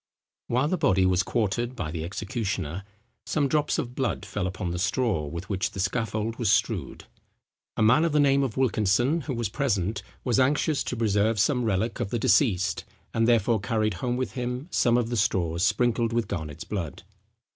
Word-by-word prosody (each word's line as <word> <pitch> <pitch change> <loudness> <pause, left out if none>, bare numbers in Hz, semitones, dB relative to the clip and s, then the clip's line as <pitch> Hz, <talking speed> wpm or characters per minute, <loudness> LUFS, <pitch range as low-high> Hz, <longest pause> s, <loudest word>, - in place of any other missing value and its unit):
While 130 +4 +1
the 180 +2 -1
body 95 - +3
was 90 0 +3
quartered 120 +3 -1
by 75 - -4
the 80 -1 -4
executioner, 95 - -3 0.4
some 145 -2 0
drops 150 +2 +1
of 120 -1 -3
blood 125 -5 -2
fell 100 -2 -2
upon 95 -1 -4
the 90 - -3
straw 95 - 0
with 85 +5 -6
which 100 -2 -1
the - - -6
scaffold 110 +2 -1
was 115 -5 +2
strewed. 110 -2 0 0.7
A 110 - +2
man 125 +9 +5
of 170 - +1
the 150 - +2
name 140 -1 +4
of 130 -4 -2
Wilkinson, 120 - +2
who 135 - -2
was 115 -1 -1
present, 105 -4 -1 0.2
was 120 -2 +1
anxious 145 +3 +2
to 125 - -3
preserve 105 0 +1
some 125 +3 +2
relic 110 +3 0
of 115 -5 -2
the 120 - -1
deceased, 105 -5 +2 0.3
and 115 0 +2
therefore 115 -1 +3
carried 110 +1 0
home 125 -1 -1
with 130 - -2
him 125 +3 -4
some 120 0 +3
of 120 -2 0
the 120 - -1
straws 85 -4 +1
sprinkled 120 0 +2
with 120 -1 0
Garnet's 75 -3 -5
blood. 90 -8 -5
115 Hz, 190 wpm, -26 LUFS, 95-125 Hz, 0.7 s, man